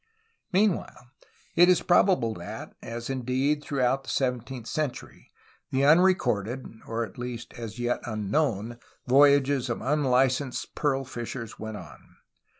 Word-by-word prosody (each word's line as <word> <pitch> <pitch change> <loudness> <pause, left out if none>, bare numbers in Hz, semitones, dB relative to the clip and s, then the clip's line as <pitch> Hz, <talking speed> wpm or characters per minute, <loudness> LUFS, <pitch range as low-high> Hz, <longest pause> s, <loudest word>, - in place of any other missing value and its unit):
Meanwhile, 185 - 0 0.4
it 175 +1 +7
is 180 - +4
probable 175 - +3
that, - - -8
as 115 0 -6
indeed 135 +3 0
throughout 135 -1 0
the - - -9
sev 130 -2 +1
enteenth 125 0 -9
century, 145 +2 -4 0.4
the 135 +1 +1
unrecorded 145 - +3 0.2
(or 115 +1 -1
at 110 - -14
least 120 -1 -6
as 115 -3 -7
yet 120 0 0
un 105 -3 -4
known) 120 -5 0 0.3
voyages 140 -1 +4
of 120 - -2
unlicensed 130 -1 +1
pearl 135 -2 0
fishers 120 -1 -6
went 110 -1 -5
on. 90 - -13
130 Hz, 135 wpm, -27 LUFS, 120-145 Hz, 0.4 s, it